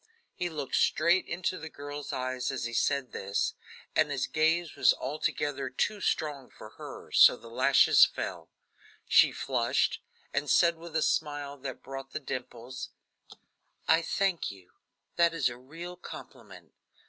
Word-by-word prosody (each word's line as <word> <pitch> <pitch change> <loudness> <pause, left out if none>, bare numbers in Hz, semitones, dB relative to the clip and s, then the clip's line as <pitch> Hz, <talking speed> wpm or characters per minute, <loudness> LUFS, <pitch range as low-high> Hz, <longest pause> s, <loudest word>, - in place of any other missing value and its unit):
'" - - -42
He 175 - -3
looked 150 -5 -2
straight 170 +4 +3
into 180 +2 -2
the 160 - -7
girl's 145 0 -7
eyes 130 -1 -2
as 130 - -4
he 115 0 -4
said 135 +3 0
this, 100 +1 -1 0.4
and 155 - +3
his 135 -3 -1
gaze 160 +2 +1
was - - +5
altogether 145 -1 -2
too 205 +9 -1
strong 145 -7 -1
for 110 - -12
her, - - -10
so - - +7
the 115 0 -13
lashes - - +6
fell. - - -1 0.6
She - - +6
flushed - - 0 0.3
and - - -1
said 170 -1 +5
with 165 -1 -10
a 160 - +2
smile 145 -2 -1
that 130 -1 -7
brought 135 0 -8
the - - -2
dimples: 130 -2 -6 1.0
"I 165 - +5
thank 190 0 0
you; 95 -3 -13 0.5
that 170 -1 +4
is 145 -6 +2
a 120 - -8
real 165 +8 -9
compliment." 105 - -12
145 Hz, 155 wpm, -29 LUFS, 130-165 Hz, 1.0 s, so